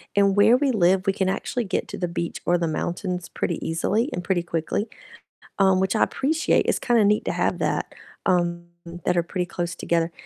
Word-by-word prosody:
and 200 -1 +4
where 210 +4 +6
we 275 -1 +1
live, 190 -2 +3
we 195 - +3
can 190 -1 0
actually 235 +5 -2
get 190 - -2
to - - -6
the 175 - -1
beach 170 0 -4
or 175 0 +3
the 170 - -1
mountains 180 +3 -3
pretty 170 - -3
easily, 210 - 0
and 180 - -4
pretty 175 -1 0
quickly, 170 +5 -2 0.7
um, 190 -1 +4
which 190 0 0
I - - +4
appreciate, 310 +4 +1
it's - - +1
kinda 235 -4 +3
neat 210 +1 +3
to - - 0
have - - 0
that, - - -1 0.3
um, 175 -2 +1 0.4
that 180 - +2
are 170 - +3
pretty 180 +1 -3
close 175 -1 -4
together, 170 0 0
185 Hz, 205 wpm, -24 LUFS, 175-205 Hz, 0.7 s, where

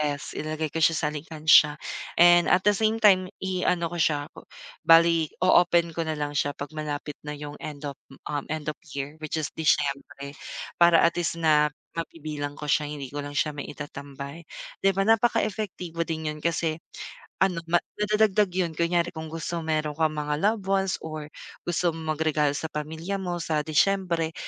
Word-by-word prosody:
ref, 145 - -10 0.2
ilalagay 155 0 -3
ko 165 - -1
siya 165 - +5
sa 150 - 0
alkansiya, 155 0 +4 0.5
and 175 0 +7
at 180 +1 +4
the 205 - +5
same 220 +2 +2
time 190 -4 +5 0.2
i-ano 180 -2 0
ko 175 - -4
siya 145 -3 +1 0.6
bale 165 -1 +6 0.2
o - - +3
open 170 -1 +2
ko 170 - -1
na 155 - -1
lang 145 0 -2
siya 145 0 0
pag 145 - -6
malapit 150 -1 -4
na 150 - -3
yung 145 0 -7
end 150 -1 -7
of 140 - -7 0.3
um, 145 -1 -3
end 155 -2 -4
of - - -16 0.2
year 140 +3 -5
which 155 - -3
is 155 - -3
Disyembre 140 -2 0 0.5
para 170 -1 +7
at 170 0 +3
least 170 - -1
na 150 -2 +4 0.3
mabibilang 150 -3 -5
ko 150 - -5
siya 150 +1 +2
hindi 145 -2 -6
ko 145 0 -4
lang 145 - -6
siya 150 0 0
maitatambay, 140 +1 -8 0.4
di 195 - +5
ba 195 +1 0
napaka-epektibo 215 -7 +1
din 160 -2 -4
yun 150 - -8
kasi, 165 -1 0 0.7
ano 180 -3 +2 0.4
nadadagdag 210 -1 +3
yun 180 -3 0
kunyari 170 +1 0
kung 160 -1 -6
gusto 165 +1 -4
meron 155 -1 -1
kang 160 -1 +2
mga 150 0 -1
loved 210 -1 +1
ones 195 -1 +1
or 155 -2 -6 0.4
gusto 175 -1 +1
mong 160 -1 -3
mag-regalalo 150 -2 +1
sa 160 - -5
pamilya 160 +6 -4
mo 175 -2 -2
sa 155 -2 0
Disyembre 170 0 +1
160 Hz, 175 wpm, -26 LUFS, 150-175 Hz, 0.7 s, and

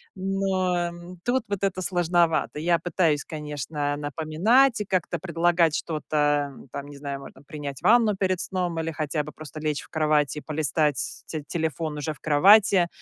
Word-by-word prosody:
Но, 190 -1 0
ам, 175 +1 -10
тут 245 0 +1
вот 200 -1 -3
это 190 -1 0
сложновато. 175 -4 +1
Я 170 +1 +2
пытаюсь, 165 -4 +1
конечно, 150 -1 -3
напоминать 165 - +2
и - - -2
как-то 180 -3 -1
предлагать 170 -1 +2
что-то, 150 -2 0
ам. 135 -1 -13
Там, 140 0 -6
не 145 - -11
знаю, 140 -1 -5
можно 140 - -12
принять 140 -2 -7
ванну 225 -3 +4
перед 185 -2 0
сном 180 -3 -2
или 165 0 -2
хотя 150 -1 -2
бы 150 - -9
просто 155 0 -10
лечь 150 -2 -1
в - - -15
кровать 155 -2 +1
и 150 - -5
полистать 150 -2 -1
те 155 -2 -5
телефон 160 -1 -2
уже 155 +1 -3
в - - -19
кровати, 190 +4 +5
160 Hz, 170 wpm, -25 LUFS, 150-185 Hz, -, кровати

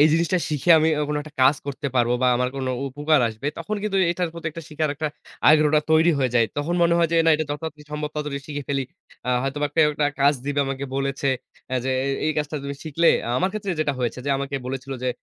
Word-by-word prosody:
এই 150 - +8
জিনিসটা 170 +2 +2
শিখে 155 +3 0
আমি 155 +1 +3
ও - - +1
কোন 150 - -1
একটা 155 -1 -13
কাজ 130 +3 +5
করতে 140 +1 -4
পারব 120 -1 +3
বা - - +4
আমার 125 +1 +1
কোন 135 -1 -3 0.2
উপকার 145 +2 +2
আসবে 110 +5 -7
তখন 210 +6 -3
কিন্তু 210 -2 -1
এটার 175 0 -1
প্রতি 165 -1 -7
একটা 165 +2 -8
শিখার 155 0 -1
একটা 155 +2 -3 0.4
আগ্রহটা 150 0 +5
তৈরি 160 +2 +5
হয়ে 130 -3 +1
যায়। 115 -1 +5
তখন 150 +4 -1
মনে 170 0 +4
হয় 170 -1 +3
যে - - 0
না 165 - +6
এটা 155 +1 0
যথা 145 - -1
তাড়াতাড়ি 150 -2 -7
সম্ভব 150 0 -3
তত - - -33
তাড়াতাড়ি 150 -2 -3
শিখে 145 -1 -4
ফেলি। 140 -1 0 0.4
আ - - -3
হয়তো 135 +2 -2
বা 145 - +2
কেউ 160 -2 +5
একটা 150 0 +1
কাজ 140 +1 +5
দিবে 145 0 +1
আমাকে 135 0 -3
বলেছে 140 0 -1 0.4
এ - - +1
যে 130 - 0
এ - - -1 0.2
এই 155 - +2
কাজটা 150 0 -2
তুমি 140 0 -4
শিখলে 165 +2 +1 0.3
আমার 185 +7 +2
ক্ষেত্রে 205 -3 -3
যেটা 150 -2 +1
হয়েছে 120 0 -2
যে - - +1
আমাকে 140 +1 -4
বলেছিল 135 +1 -5
যে 130 - +1
150 Hz, 250 wpm, -23 LUFS, 140-160 Hz, 0.4 s, এই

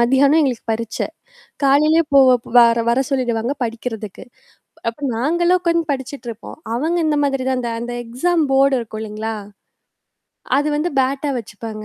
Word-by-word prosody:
மதியானம் 270 +5 +4
எங்களுக்கு 260 -6 -1
பரீட்சை. 225 0 -3 0.6
காலையிலேயே 305 +4 +4
போ 275 - +8 0.4
வர 235 -1 +5
வர 245 +3 +3
சொல்லிடுவாங்க 245 -1 -1
படிக்கிறதுக்கு. 225 -3 -6 0.6
அப்ப 230 - -5 0.2
நாங்களும் 345 +8 +2
உட்கந்து 335 -1 +1
படிச்சுட்டு 265 -1 -6
இருப்போம். 230 +6 -10 0.2
அவங்க 320 +7 0
இந்த 300 -1 +1
மாதிரி 270 -2 0
தான் 260 -1 0
அந்த 235 - -3
அந்த 240 0 -5
எக்ஸாம் 310 +8 0
போர்டு 270 0 +4
இருக்கும், 220 -2 -7
இல்லைங்களா? 220 +1 -4 1.2
அது 290 +1 0
வந்து, 320 +4 -1
பேட்டா 275 +2 -1
வச்சுப்பாங்க. 215 0 -8
260 Hz, 140 wpm, -19 LUFS, 230-295 Hz, 1.2 s, போ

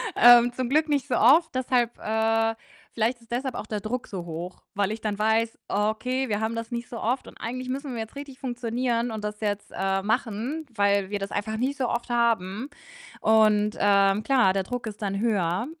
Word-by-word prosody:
Ähm, 240 0 +7
zum 255 -1 -2
Glück 305 +3 +2
nicht 285 -1 0
so 250 - 0
oft. 295 +8 +5
Deshalb, 245 -2 +1
äh 225 +1 +1 0.4
vielleicht 235 +2 0
ist 230 0 -22
deshalb 255 +1 -2
auch - - -5
der 215 -1 -3
Druck 245 +3 -3
so 185 -4 -6
hoch, 170 +2 -7
weil 200 +1 +1
ich 220 - -5
dann 210 -2 -2
weiß: 220 +1 +1
„Okay, 225 +5 -1
wir 205 -1 0
haben 220 +1 -1
das 230 0 -4
nicht 240 -1 -4
so 230 - -7
oft 250 +4 -1
und - - -12
eigentlich 255 +2 -4
müssen 270 +1 -4
wir 230 - -4
jetzt 220 +3 -6
richtig 280 -2 -9
funktionieren 240 -1 -1
und 220 -1 -5
das 210 0 -4
jetzt, 205 -1 -2
äh, 195 +1 0
machen, 245 +7 -2
weil 200 -2 +2
wir 205 - -1
das 195 0 -5
einfach 220 +2 -2
nicht 265 +5 -1
so 255 -3 0
oft 235 +1 -3
haben.“ 230 0 0 0.5
Und, 215 -1 +4
ähm, 200 0 +4
klar, 220 -6 +3
der 195 - +1
Druck 245 +5 -5
ist 210 0 -7
dann 195 0 -1
höher. 200 -2 0
225 Hz, 210 wpm, -26 LUFS, 205-245 Hz, 0.5 s, Ähm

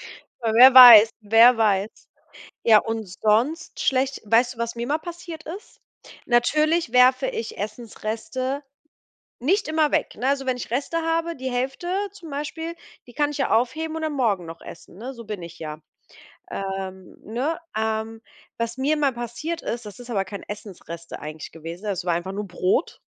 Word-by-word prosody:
W 225 -2 -6
wer 255 +3 +9
weiß, 235 -4 +11
wer 225 +4 +6
weiß? 205 -2 +2 0.8
Ja, 220 -2 +7
und 225 0 -3
sonst 220 - 0
schlecht 265 0 0
Weißt 235 +4 +3
du, - - -21
was 235 0 -3
mir 235 0 -4
mal 295 +4 0
passiert 340 -1 -9
ist? 385 +8 -10 0.5
Natürlich 305 +4 +2
werfe 255 - +5
ich 455 -2 -5
Essensreste 230 +4 -4 0.8
nicht 385 - +1
immer 310 -1 +1
weg, - - 0
ne? 255 - -2
Also, 275 -1 0
wenn 255 -1 0
ich 240 - -7
Reste 280 +7 -1
habe, 330 +1 -1
die 260 0 -5
Hälfte 265 +7 -3 0.2
zum 370 -5 -12
Beispiel, 320 +4 -5 0.3
die 245 - -14
kann 290 +4 +1
ich 295 - -6
ja 270 - -1
aufheben 310 +8 0
und 320 - -4
dann 310 -1 -2
morgen 215 -10 0
noch 165 0 -10
essen, 170 - -12
ne? 250 +6 -7
So 235 -2 -11
bin 210 -4 -6
ich 170 0 -11
ja, 155 -1 -6 0.7
ähm, 190 -1 -6
ne? 270 +10 -2 0.2
Ähm, 220 0 -2 0.4
was 230 0 -3
mir 285 +4 +1
mal 285 -3 +1
passiert 240 +8 -5
ist, 235 -1 -4
das 210 0 -10
ist 245 0 -11
aber 195 -5 -1
kein 200 +1 -8
Essensreste 175 -5 -9
eigentlich 155 +1 -8
gewesen, 165 +5 -9
das 195 -3 -2
war 175 - +1
einfach 180 +3 -4
nur 205 +1 -4
Brot. 185 - -1
240 Hz, 175 wpm, -23 LUFS, 210-290 Hz, 0.8 s, weiß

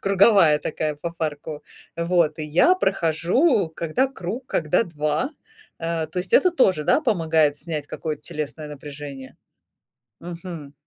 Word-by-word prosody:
круговая 195 -5 +5
такая 155 0 -2
по 160 +4 -5
парку. 155 -2 -5 0.3
Вот, 170 -2 +1
и 155 - -3
я 175 - +4
прохожу, 190 - +2
когда 170 +13 0
круг, 245 0 -6
когда 165 - +1
2. 150 - -1 0.5
Э, 165 -1 -2
то 180 - -5
есть 180 0 -4
это 365 - +6
тоже, 190 - +2
да, 290 - +3
помогает 160 - +2
снять 150 -1 -4
какое-то 155 0 -5
телесное 155 -1 -5
напряжение. 140 -2 -9 0.8
Мгм. 170 -4 -8
165 Hz, 135 wpm, -23 LUFS, 150-185 Hz, 0.8 s, это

